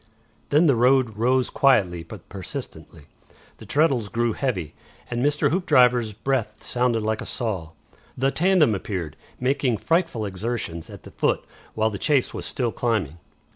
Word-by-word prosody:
Then 150 +4 +4
the 140 -5 +4
road 125 -1 +3
rose 125 +3 +1
quietly 95 -11 +3
but 90 +2 -11
persistently; 90 -4 -8 0.5
the - - -13
treadles 140 -8 +2
grew 115 +1 0
heavy, 95 - -2 0.4
and 120 +1 -1
Mr. 145 +1 +2
Hoopdriver's 125 - +3
breath 110 -1 -2
sounded 120 -3 0
like 110 0 -1
a - - -6
saw. 100 -10 -3 0.5
The 135 +2 +2
tandem 175 - +3
appeared, 90 -6 -4 0.2
making 130 -2 +1
frightful 165 - 0
exertions, 95 -4 -4
at - - -11
the - - -11
foot, - - 0 0.3
while 110 0 +1
the 100 - -5
chase 145 -4 +1
was - - -5
still 120 -3 -1
climbing. 105 - -1
120 Hz, 150 wpm, -24 LUFS, 105-135 Hz, 0.5 s, Then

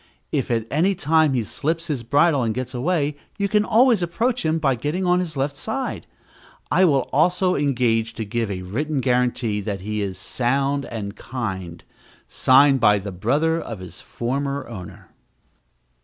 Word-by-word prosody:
If - - -1
at 115 -2 0
any 180 +7 +2
time 155 -3 +2
he 120 - +1
slips 160 +9 -2
his 150 -7 -2
bridle 145 +4 +3
and 115 -2 -1
gets 130 0 -4
away, 145 +2 0 0.2
you 200 -1 0
can 210 +1 +2
always 230 -1 +4
approach 230 +9 -1
him 160 0 +1
by 140 -4 +2
getting 150 +10 -2
on 180 0 +3
his 165 -5 -4
left 140 +1 -1
side. 255 - -4 0.6
I 190 - +5
will 140 -6 +2
also 180 +5 +3
engage 120 -6 +1
to 110 - -4
give 115 +1 -2
a 95 -2 -4
written 140 +10 -2
guarantee 125 -4 0
that 100 -2 -4
he 105 +2 -3
is 95 -2 -3
sound 135 +2 -1
and 105 -3 -6
kind, 95 -9 -5 0.4
signed 135 +1 +5
by 105 -3 +5
the 100 0 -5
brother 145 - +1
of 115 - -6
his 95 -2 -11
former 140 +3 -3
owner. 95 -7 -10
135 Hz, 170 wpm, -22 LUFS, 115-160 Hz, 0.6 s, I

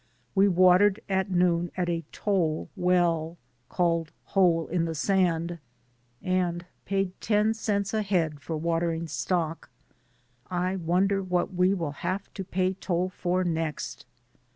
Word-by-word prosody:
We 195 +1 +5
watered 185 +2 +5
at 190 0 0
noon 175 -1 +2
at 180 -1 0
a 170 -1 -1
toll 175 -7 0
well, 175 -2 +1 0.3
called 165 -2 0
Hole 175 -4 +2
in 170 -1 0
the 165 -1 -3
sand, 170 -1 +1 0.6
and 180 -1 0 0.2
paid 195 -1 0
ten 215 0 +2
cents 200 -3 -1
a 220 - +1
head 170 -7 0
for 155 +2 -4
watering 165 0 -1
stock. 165 +1 -2 0.8
I 180 +1 -1
wonder 190 +3 +1
what 180 0 -1
we 180 +2 +3
will 165 -6 -2
have 190 +2 -3
to 195 - -5
pay 185 +1 0
toll 180 -1 -1
for 180 0 -1
next 160 -6 -3
180 Hz, 135 wpm, -27 LUFS, 170-190 Hz, 0.8 s, We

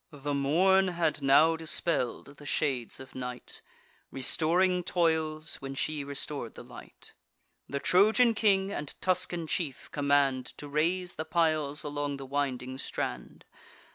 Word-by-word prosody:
The 145 -1 -4
morn 180 +8 +3
had 170 -4 -1
now 145 +4 +5
dispell'd 150 -4 -1
the 145 - -13
shades 130 -7 -1
of 130 0 -11
night, 125 -1 -6 0.5
Restoring 175 +7 +2
toils, 160 -3 0
when 135 0 -7
she 150 +1 -2
restor'd 140 -3 -5
the - - -9
light. - - -12 0.6
The 140 - -2
Trojan 220 - +4
king 200 -3 +2
and 150 -7 -5
Tuscan 180 -2 0
chief 155 -4 -3
command 140 -3 +1
To 145 - -8
raise 175 +5 -1
the 160 - -3
piles 155 -3 +1
along 145 -1 -3
the 135 - -8
winding 130 -2 -2
strand. 60 - -5
150 Hz, 135 wpm, -29 LUFS, 140-170 Hz, 0.6 s, now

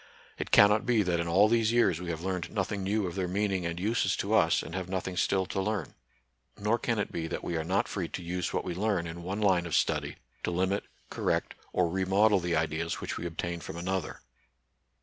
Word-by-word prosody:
It - - -3
cannot 105 +1 +6
be 115 -4 +4
that 90 -2 0
in 85 - -1
all 95 +5 +5
these 115 0 +3
years 95 -8 +3
we 90 - -5
have 80 0 -4
learned 90 -2 -2
nothing 100 -1 -2
new 100 +2 0
of 90 - -4
their 95 -2 -1
meaning 95 -1 0
and 85 0 -4
uses 110 +5 +1
to - - -2
us, - - +4
and 85 - -8
have 90 -1 -4
nothing 95 -1 -3
still 95 +1 +1
to 95 +1 -2
learn. 105 -3 -2 0.6
Nor 105 +3 +1
can 115 -1 0
it 100 - -1
be 80 -1 -3
that - - -4
we 85 - -2
are 80 - -1
not 95 +5 +1
free 90 -4 -3
to 90 - -6
xise 90 0 -2
what - - -1
we 90 - -3
learn 95 -1 0
in 85 +1 -6
one 95 +5 -3
line 90 -4 +3
of 85 - -1
study - - +1 0.3
to - - -1
limit, 95 +3 0 0.3
correct, - - -1 0.2
or 90 -1 +2
remodel 95 +3 +3
the 85 -1 -1
ideas 80 +1 -1
which - - -4
we 85 - -3
obtain 85 +1 -4
from 85 - -7
another. 95 +2 -3
95 Hz, 230 wpm, -29 LUFS, 85-100 Hz, 0.6 s, cannot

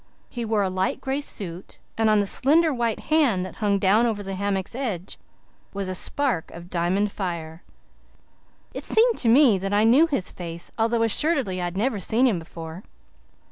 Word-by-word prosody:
He 240 -2 -5
wore 215 -2 +1
a 190 - 0
light 185 0 -1
gray 270 +2 -2
suit, 185 -9 -4 0.2
and 225 -1 +2
on 215 -1 +4
the 205 - +1
slender 305 +9 +3
white 235 -3 -1
hand 255 -13 +3
that - - -10
hung 205 -2 +1
down 205 +5 +3
over 210 -3 -3
the 195 0 -5
hammock's 195 -1 -2
edge 220 -9 -5 0.6
was 200 -1 -3
a 185 - -3
spark 250 - -1
of 170 +1 -12
diamond 185 +4 0
fire. 170 -4 -5 1.1
It - - -6
seemed 460 +1 +3
to 235 - +2
me 240 -5 +5
that 195 +2 -3
I 205 +1 +3
knew 260 +9 +5
his 275 - -2
face, 170 -1 -7
although 230 +1 +1
assuredly 230 - +1
I - - -1
had 175 +1 -5
never 225 0 0
seen 225 +7 +2
him 215 -9 +2
before. 165 +1 -9
205 Hz, 185 wpm, -24 LUFS, 185-240 Hz, 1.1 s, me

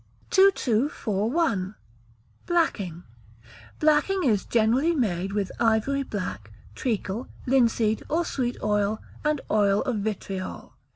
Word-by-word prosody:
2241. 230 - +2 0.7
Blacking. 200 - 0 0.8
Blacking 310 +5 +3
is 215 -8 +2
generally 245 +9 +2
made 195 - 0
with 200 -2 -1
ivory 230 +5 +2
black, 110 - -5 0.2
treacle, 220 - -2 0.2
linseed, 230 -4 +2
or 335 +2 +1
sweet 250 -5 -2
oil, 210 0 +1 0.2
and 300 -1 +1
oil 205 -1 +3
of 255 -5 -1
vitriol. 200 -2 -4
220 Hz, 100 wpm, -26 LUFS, 200-275 Hz, 0.8 s, Blacking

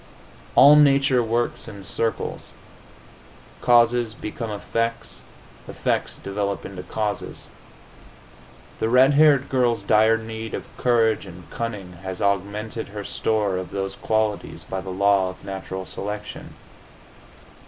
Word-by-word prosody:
All 145 +1 +9
nature 140 -3 +5
works 120 +1 -1
in 100 -2 -9
circles. 115 +3 -3 1.1
Causes 120 -1 +3
become 115 0 -5
effects; 115 +2 -3 0.5
effects - - -2
develop 100 0 -3
into 95 -2 -7
causes. 105 +2 -4 1.3
The 110 - 0
red 130 +4 +5
haired 145 -2 +5
girl's 120 -5 +1
dire 110 +2 +4
need 110 0 -6
of - - -9
courage 115 -4 +2
and 90 -1 -12
cunning 100 -6 -5
has 95 -1 -6
augmented 100 +3 -2
her 105 0 -7
store 105 -2 0
of 90 -2 -5
those 95 0 -4
qualities 110 -1 -1
by 95 - -4
the 95 - -8
law 95 0 +2
of 90 - -11
natural 95 -1 -5
selection. 105 +2 -7
110 Hz, 120 wpm, -23 LUFS, 100-115 Hz, 1.3 s, All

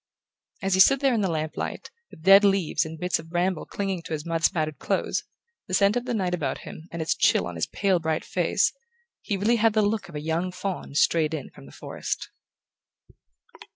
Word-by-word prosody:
As 195 0 +1
he 190 - +2
stood 275 +8 +7
there 270 -2 +3
in 225 - +1
the 190 - +1
lamp 155 -1 -2
light, - - -5 0.2
with 160 - -15
dead 195 +2 +8
leaves 195 -7 +2
and 160 0 -8
bits 180 0 0
of 160 0 -11
bramble 175 0 -1
clinging 195 -3 -3
to - - -5
his 155 0 -4
mud 165 -1 -2
spattered 155 -3 +1
clothes, - - -1 0.4
the 185 - 0
scent 200 +2 +4
of 245 0 -1
the 245 -2 -2
night 185 -4 -1
about 145 -7 -1
him 160 - -10
and 165 -1 -3
its 160 - +1
chill - - +3
on 90 - -5
his 80 -1 -2
pale 195 -3 +1
bright 160 -1 -2
face, - - +1 0.5
he 205 - -2
really 220 +5 +2
had 225 0 +3
the 215 -1 +3
look 205 -1 -1
of 160 - -11
a - - -2
young 165 +4 -1
faun 180 -6 -5
strayed 160 0 +3
in 145 - -7
from - - -14
the - - -13
forest. - - -5
180 Hz, 220 wpm, -25 LUFS, 160-200 Hz, 0.5 s, dead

